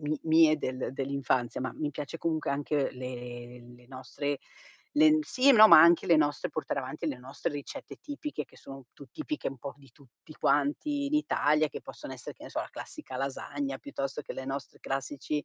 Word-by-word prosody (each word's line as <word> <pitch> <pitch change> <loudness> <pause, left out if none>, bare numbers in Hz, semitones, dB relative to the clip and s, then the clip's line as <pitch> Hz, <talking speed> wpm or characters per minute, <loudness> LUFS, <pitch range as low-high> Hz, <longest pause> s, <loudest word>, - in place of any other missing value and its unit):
mi 150 0 -2
mie 160 -1 +5
del 130 -2 -3
dell'infanzia, 135 -3 -1
ma 130 - -3
mi 150 -1 -3
piace 150 +3 -6
comunque 160 -1 -1
anche 145 0 0
le 125 -1 -7
le 125 0 -19
nostre 135 +2 -4 0.6
len 310 +1 +7
sì, 275 -2 +4
no, 220 -5 +10
ma 155 - +10
anche 170 +1 +6
le 170 - +6
nostre 145 -1 +1
portare 155 - -3
avanti 140 +5 -4
le 135 -4 -4
nostre 135 +6 -4
ricette 145 -1 -7
tipiche 290 - -5
che - - -21
sono 135 -2 -11
tu 140 - -12
tipiche 305 -1 -3
un 135 - -10
po' 140 +3 -7
di 140 -3 -19
tutti 135 +4 -18
quanti 280 - +1
in 290 - -1
Italia 155 - +3
che - - -7
possono - - -9
essere, - - -8
che - - -14
ne - - -8
so, - - -2
la - - -6
classica 130 - -8
lasagna, 140 - -3
piuttosto 145 - -4
che - - -7
le 130 - -6
nostre 135 +1 -5
classici, 140 +2 -3
145 Hz, 195 wpm, -30 LUFS, 135-160 Hz, 0.6 s, no